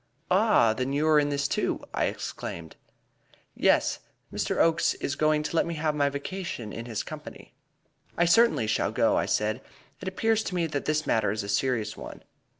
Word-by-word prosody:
"Ah! 185 Hz, -, +4 dB
Then 130 Hz, +4 st, -2 dB
you 150 Hz, +2 st, +1 dB
are 155 Hz, -1 st, +6 dB
in 145 Hz, 0 st, +1 dB
this 140 Hz, -1 st, 0 dB
too?" -, -, -1 dB
I -, -, +1 dB
exclaimed. 85 Hz, -2 st, -5 dB, 0.8 s
"Yes, -, -, +2 dB, 0.3 s
Mr. -, -, -1 dB
Oakes 165 Hz, 0 st, +3 dB
is 140 Hz, -, -3 dB
going 155 Hz, 0 st, +2 dB
to 155 Hz, -, -4 dB
let 165 Hz, -, +2 dB
me 170 Hz, -, -3 dB
have 155 Hz, 0 st, 0 dB
my 145 Hz, -1 st, +2 dB
vacation 140 Hz, -, -5 dB
in 115 Hz, -, -6 dB
his 115 Hz, -3 st, -3 dB
company." -, -, -10 dB, 0.6 s
"I 175 Hz, -, +4 dB
certainly 200 Hz, -, +4 dB
shall 110 Hz, -, 0 dB
go," -, -, +2 dB
I -, -, +1 dB
said; 110 Hz, +4 st, 0 dB, 0.4 s
"it 185 Hz, -, -6 dB
appears 225 Hz, +3 st, +1 dB
to 185 Hz, -, -3 dB
me 170 Hz, -2 st, +1 dB
that 145 Hz, -3 st, -3 dB
this 155 Hz, 0 st, 0 dB
matter 110 Hz, -2 st, +2 dB
is 105 Hz, +1 st, -2 dB
a 100 Hz, -, -7 dB
serious 110 Hz, -1 st, 0 dB
one." -, -, -10 dB
145 Hz, 190 wpm, -27 LUFS, 115-170 Hz, 0.8 s, are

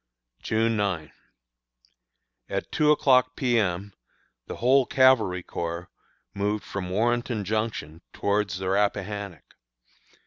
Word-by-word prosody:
June 115 Hz, +1 st, +1 dB
9. 95 Hz, -7 st, -2 dB, 1.4 s
At -, -, -3 dB
two 150 Hz, -1 st, +2 dB
o'clock 130 Hz, -4 st, +4 dB
P. 120 Hz, -4 st, +2 dB
M. 95 Hz, 0 st, -2 dB, 0.5 s
the -, -, -6 dB
whole 130 Hz, +1 st, +3 dB
Cavalry 120 Hz, -9 st, +3 dB
Corps 85 Hz, +1 st, -5 dB, 0.4 s
moved 105 Hz, +1 st, -1 dB
from 95 Hz, -2 st, -5 dB
Warrenton 120 Hz, +2 st, 0 dB
Junction 105 Hz, -7 st, -3 dB
towards 100 Hz, -2 st, -1 dB
the 95 Hz, 0 st, -4 dB
Rappahannock. 100 Hz, -3 st, -2 dB
105 Hz, 105 wpm, -26 LUFS, 95-120 Hz, 1.4 s, o'clock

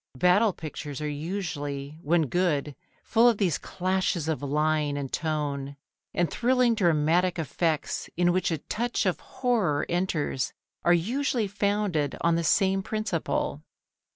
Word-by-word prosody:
Battle 190 Hz, -, +4 dB
pictures 150 Hz, -4 st, -7 dB
are 150 Hz, -, -2 dB
usually, 145 Hz, -3 st, -4 dB
when 165 Hz, 0 st, +2 dB
good, 150 Hz, -2 st, 0 dB, 0.3 s
full 235 Hz, +1 st, +5 dB
of 230 Hz, -, +1 dB
these 180 Hz, -7 st, +1 dB
clashes 185 Hz, -3 st, -1 dB
of 160 Hz, -3 st, -1 dB
line 150 Hz, 0 st, +1 dB
and 140 Hz, -2 st, -5 dB
tone, 145 Hz, -3 st, -2 dB, 0.3 s
and 175 Hz, -, +1 dB
thrilling 250 Hz, +2 st, +2 dB
dramatic 175 Hz, -2 st, +2 dB
effects 160 Hz, 0 st, -1 dB
in 175 Hz, 0 st, +3 dB
which 185 Hz, -, +1 dB
a 165 Hz, -, 0 dB
touch 235 Hz, +7 st, -2 dB
of 185 Hz, -, +1 dB
horror 215 Hz, -, 0 dB
enters 170 Hz, -6 st, -1 dB, 0.3 s
are 175 Hz, -, +4 dB
usually 235 Hz, +7 st, +1 dB
founded 200 Hz, -7 st, 0 dB
on 170 Hz, -, +3 dB
the 170 Hz, 0 st, +1 dB
same 195 Hz, +3 st, +3 dB
principle. 215 Hz, +3 st, -2 dB
170 Hz, 135 wpm, -27 LUFS, 150-195 Hz, 0.3 s, full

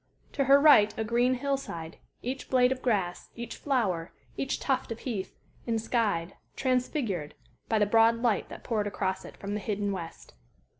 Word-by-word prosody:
To 275 Hz, -, 0 dB
her 275 Hz, +2 st, +7 dB
right 280 Hz, -9 st, +6 dB
a 220 Hz, -, 0 dB
green 240 Hz, +3 st, +2 dB
hill 275 Hz, +2 st, 0 dB
side 165 Hz, -11 st, -7 dB, 0.3 s
each 260 Hz, +3 st, -4 dB
blade 250 Hz, -1 st, +4 dB
of 260 Hz, -1 st, -2 dB
grass, 195 Hz, -8 st, -1 dB
each 235 Hz, 0 st, -6 dB
flower, 195 Hz, -, 0 dB, 0.2 s
each 270 Hz, -, -2 dB
tuft 260 Hz, -3 st, -1 dB
of 230 Hz, -, -5 dB
heath, 210 Hz, -7 st, -4 dB, 0.3 s
enskied, 220 Hz, -6 st, 0 dB, 0.2 s
transfigured, 250 Hz, -, -1 dB, 0.3 s
by 220 Hz, -, +3 dB
the 210 Hz, -, +4 dB
broad 225 Hz, +2 st, +5 dB
light 230 Hz, -4 st, +1 dB
that -, -, -10 dB
poured 215 Hz, -4 st, -1 dB
across 190 Hz, -2 st, -2 dB
it -, -, -11 dB
from 200 Hz, +1 st, -5 dB
the 210 Hz, -, -1 dB
hidden 205 Hz, 0 st, -2 dB
west. 170 Hz, -4 st, -7 dB
225 Hz, 170 wpm, -29 LUFS, 200-255 Hz, 0.3 s, her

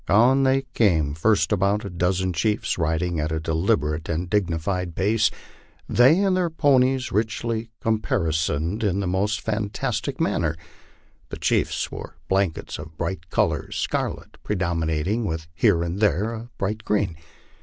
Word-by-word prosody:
On 125 Hz, +6 st, +5 dB
they 135 Hz, 0 st, +3 dB
came, 80 Hz, -10 st, +2 dB
first 105 Hz, +10 st, +2 dB
about 100 Hz, +1 st, +1 dB
a -, -, -4 dB
dozen 90 Hz, +1 st, 0 dB
chiefs, 105 Hz, +2 st, 0 dB
riding 80 Hz, +1 st, 0 dB
at 75 Hz, +1 st, -1 dB
a 80 Hz, -, -1 dB
deliberate 80 Hz, -1 st, 0 dB
and 85 Hz, +2 st, -1 dB
digni 90 Hz, -6 st, +1 dB
fied 90 Hz, -1 st, -2 dB
puce, 105 Hz, +2 st, +2 dB, 0.6 s
they 130 Hz, +7 st, +5 dB
and 190 Hz, -2 st, +2 dB
their 180 Hz, -2 st, +1 dB
ponies 135 Hz, -4 st, +2 dB
richly 115 Hz, +1 st, -1 dB
caparisoned 85 Hz, -3 st, 0 dB
in 100 Hz, -2 st, +1 dB
the 100 Hz, -, -1 dB
most 100 Hz, +4 st, 0 dB
fantastic 105 Hz, -2 st, -2 dB
man -, -, +1 dB
ner. 80 Hz, -2 st, 0 dB, 0.7 s
The -, -, -6 dB
chiefs -, -, 0 dB
wore -, -, -8 dB
blankets 95 Hz, -6 st, -1 dB
of 80 Hz, +1 st, -10 dB
bright 85 Hz, +3 st, -4 dB
colors, -, -, 0 dB
scarlet -, -, -3 dB
predominating, 85 Hz, +2 st, -1 dB
with 80 Hz, -5 st, -3 dB
here 85 Hz, -1 st, +3 dB
and 85 Hz, +3 st, -3 dB
there 105 Hz, +1 st, +2 dB
a 115 Hz, +1 st, -7 dB
bright 105 Hz, +3 st, -2 dB
green. 105 Hz, -5 st, 0 dB
100 Hz, 150 wpm, -24 LUFS, 85-110 Hz, 0.7 s, On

